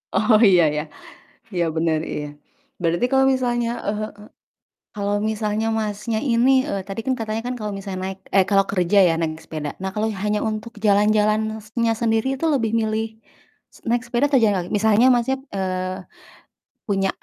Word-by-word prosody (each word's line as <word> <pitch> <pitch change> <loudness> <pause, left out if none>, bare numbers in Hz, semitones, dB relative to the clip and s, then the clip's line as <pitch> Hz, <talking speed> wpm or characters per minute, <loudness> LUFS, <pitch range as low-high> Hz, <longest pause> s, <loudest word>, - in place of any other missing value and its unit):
Oh, 215 +2 +4
iya 180 -3 +5
iya, 150 0 -1 0.7
iya, 175 -1 +1
bener, 160 -1 +1
iya. 150 - -3 0.6
Berarti 170 +6 +1
kalo 265 0 +4
misalnya 240 -2 0 0.2
eee, 210 +1 -1 0.9
kalo 200 -1 -2 0.2
misalnya 215 0 -1
Masnya 215 +1 -2
ini, 235 +3 +3 0.2
eee, 195 - -2
tadi 195 +2 -5
kan 265 - +1
katanya 220 0 -3
kan 250 - -2
kalo 210 -1 -3
misalnya 195 -1 -6
naik 190 0 -5 0.2
eh 195 -1 +5
kalo 195 -1 +5
kerja 185 0 +1
ya 165 - +2
naik 160 -1 -1
sepeda. 150 -2 -5
Nah, 190 - -1
kalo 215 +1 0 0.2
hanya 210 0 +1
untuk 215 +2 -5
jalan-jalannya 215 +2 +2
sendiri 225 +1 +1
itu 330 - -1
lebih 225 -6 0
milih 220 0 -1 0.9
naik 240 +1 +1
sepeda 245 +3 +1
atau 270 - +5
jalan 205 -2 +3
kaki? - - -10
Misalnya 220 +2 +4
Masnya, 245 +3 0 0.2
eee, 185 -1 -2 0.9
punya 195 -2 +1
215 Hz, 160 wpm, -22 LUFS, 195-225 Hz, 0.9 s, iya